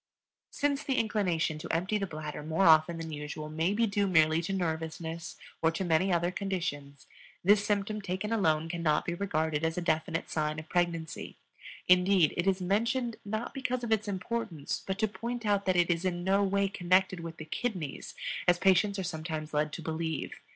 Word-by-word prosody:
Since 285 0 0
the 270 - 0
inclination 180 -8 0
to - - -7
empty 185 +6 0
the 195 - -2
bladder 155 -2 -6
more 160 +5 +1
often 160 +1 +6
than 165 -1 -5
usual 150 +1 -5
may 160 +4 0
be 225 +3 +2
due 200 -1 +1
merely 160 -2 +4
to 170 - -4
nervousness 165 -1 -3 0.2
or 160 - +4
to 165 +3 -2
many 175 +3 +2
other 175 0 +2
conditions, 165 -8 -4 0.4
this 200 +2 +5
symptom 210 +1 -1
taken 195 +3 -2
alone 160 -7 +2
cannot 165 -3 0
be 170 - -1
regarded 160 -4 -1
as 160 +1 0
a - - +2
definite 165 0 0
sign 155 -1 -1
of 160 0 -7
pregnancy. 170 -3 -2 0.5
Indeed, 180 -2 +5
it 175 +2 -1
is 190 -1 +3
mentioned, 230 +6 0
not 215 +3 -4
because 255 -3 -2
of 235 - -3
its 220 -1 +2
importance, 190 -5 -3
but 190 0 -1
to 220 0 +2
point 235 +4 -5
out 200 -1 +1
that 185 - +3
it 175 0 +3
is 170 +1 0
in 175 -1 -1
no 195 +2 +3
way 200 0 +2
connected 185 -1 +2
with 165 0 -7
the 155 - -7
kidneys, 175 - -4 0.3
as 175 0 +5
patients 195 +2 +3
are 190 - -2
sometimes 160 -3 -4
led 150 0 +1
to 165 - -6
believe. 160 -1 -3
175 Hz, 190 wpm, -30 LUFS, 160-200 Hz, 0.5 s, often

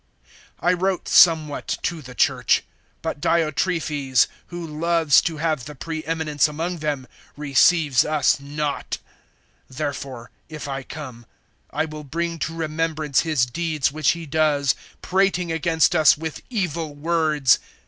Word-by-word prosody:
(9)I 180 +1 +2
wrote 190 -1 0
somewhat 155 -4 +4
to 165 -2 -2
the 130 -2 -11
church; - - +2 0.4
but 160 -3 -4
Diotrephes, 155 -5 +1 0.2
who 175 -1 -6
loves 160 -1 +3
to 165 -2 -3
have 155 -4 -1
the 150 0 -9
pre 160 +3 -5
eminence 155 -3 +1
among 165 +4 -4
them, 145 -4 -2 0.3
receives 150 -1 +4
us 150 -2 +2
not. 145 +1 -3 0.7
(10)Therefore, 135 -3 -5 0.2
if 155 -2 -7
I 135 -1 -3
come, 130 -4 -9 0.4
I - - -1
will 155 -1 -8
bring 165 +3 -3
to 165 - -3
remembrance 155 -2 -1
his 155 -7 +2
deeds 155 +2 -1
which 155 0 +2
he 170 -1 -7
does, 145 -3 +2 0.3
prating 185 -2 +1
against 160 0 +2
us 155 -2 +6
with 160 0 -5
evil 165 - -2
words. 155 -4 +2
155 Hz, 135 wpm, -23 LUFS, 145-165 Hz, 0.7 s, us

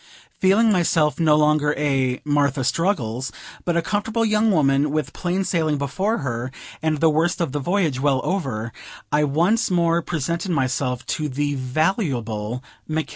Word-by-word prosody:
Feeling 210 +4 +4
myself 165 -5 +2
no 155 -2 +4
longer 150 -1 +3
a 135 -3 0
"Martha 145 -2 +1
Struggles," 130 - -1 0.3
but 175 -1 +1
a 170 - +1
comfortable 220 +4 -1
young 215 0 +2
woman, 145 -5 +3
with 155 +1 -2
plain 185 +2 -1
sailing 160 -5 0
before 190 - -1
her, 120 0 -3 0.3
and 155 -1 0
the 165 - +4
worst 165 +4 +1
of 170 -6 -1
the 145 - -2
voyage 165 -4 0
well 135 -1 +2
over, 125 - -2 0.4
I 150 0 +3
once 175 +11 +2
more 170 -2 +2
presented 170 +3 -3
myself 130 -4 -1
to 150 -1 -2
the 145 +2 -1
valuable 125 - -1 0.3
Mc 155 0 -1
K. - - -19
150 Hz, 160 wpm, -22 LUFS, 135-175 Hz, 0.4 s, Feeling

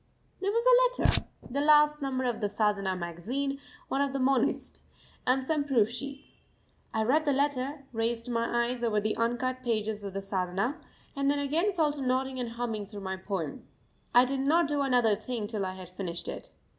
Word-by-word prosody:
There 395 +1 0
was 465 +2 +1
a - - +5
letter, - - +6 0.2
the 280 +3 -2
last 300 0 +5
number 265 -2 -1
of 245 -3 -1
the 205 - 0
Sadhana 205 -2 0
Magazine, 225 +12 -3 0.3
one 270 - 0
of 280 -1 0
the 275 - -1
Monist, 260 -1 +1 0.5
and 260 +1 +3
some 300 +2 0
proof 235 -6 +2
sheets. 275 +3 -8 0.5
I 220 - 0
read 285 +8 +3
the 290 - +2
letter, 280 0 -1
raced 230 +1 -1
my 235 0 +1
eyes 245 0 -3
over 215 -3 +2
the 215 +1 -1
uncut 245 +2 -1
pages 220 -3 -1
of 195 -1 -6
the 195 - -2
Sadhana, 195 - -2 0.3
and 275 0 +1
then 285 - +2
again 310 +8 +1
fell 315 -4 +2
to 290 -1 -6
nodding 260 0 0
and 245 -2 -2
humming 225 -4 -3
through 205 -1 -8
my 190 0 -3
poem. 185 -6 -5 0.4
I 245 +1 +6
did 270 +1 -2
not 310 +4 +3
do 290 -1 0
another 245 -6 +3
thing 225 0 -4
till 205 -3 -2
I 185 - -5
had 185 -1 -9
finished 180 -2 -4
it. - - -6
250 Hz, 195 wpm, -29 LUFS, 210-280 Hz, 0.5 s, letter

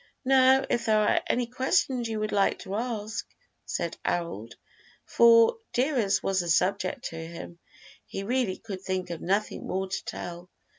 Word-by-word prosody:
"Now, 265 0 +5
if 235 0 -1
there 215 -1 +4
are 210 -1 +3
any 245 0 +1
questions 255 -1 0
you 220 -1 -2
would 215 0 -2
like 200 -1 +2
to 190 - -7
ask?" 220 -1 -3 0.4
said 170 -1 -3
Harold, 115 - -3 0.5
for, 230 - +6 0.2
dear 270 +4 +1
as 200 -5 +1
was 195 -1 +1
the 175 -1 -2
subject 200 +9 +1
to 165 - -9
him, 170 +1 -8 0.5
he 195 - -5
really 235 -3 0
could 195 -4 -7
think 185 -2 -3
of 170 - -5
nothing 200 +4 -1
more 190 +1 -2
to 190 - -4
tell. 175 +1 -7
205 Hz, 165 wpm, -27 LUFS, 185-240 Hz, 0.5 s, for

